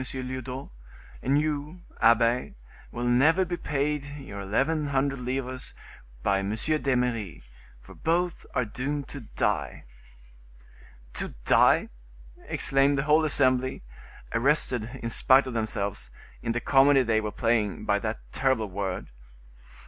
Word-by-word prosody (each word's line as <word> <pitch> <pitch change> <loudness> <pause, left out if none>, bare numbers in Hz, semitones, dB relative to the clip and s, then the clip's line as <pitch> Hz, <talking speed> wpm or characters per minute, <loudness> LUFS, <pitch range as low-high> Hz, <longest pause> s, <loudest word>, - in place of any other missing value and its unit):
Lyodot; 130 0 -5 0.5
and 140 +3 +2
you, 150 +3 -3 0.2
abbe, 115 +2 +3 0.4
will 120 - -4
never 145 +10 +4
be 175 0 -3
paid 145 -2 -1
you 135 -8 -9
eleven 140 +10 0
hundred 135 -1 0
livres 130 0 -4 0.5
by 100 -1 +2
M. 100 +2 -2
d'Eymeris; 125 - -1 0.4
for - - -13
both 175 +2 -1
are 125 - +1
doomed 135 +6 -4
to 140 - -7 0.2
die." - - -1 1.3
"To - - -4
die!" - - +4 0.6
exclaimed 135 +1 +2
the 135 - +1
whole 155 +2 +4
assembly, 130 - +2 0.5
arrested, 125 -2 +1
in 115 - -2
spite 135 +3 +5
of 130 - -5
themselves, 100 - -2 0.3
in 115 - -1
the 120 - -2
comedy 135 +1 +5
they 110 -2 +1
were 105 -1 -3
playing, 115 -3 0
by 100 - +2
that 110 +1 -4
terrible 130 -6 0
word. 95 -1 -4
130 Hz, 125 wpm, -27 LUFS, 115-140 Hz, 1.3 s, spite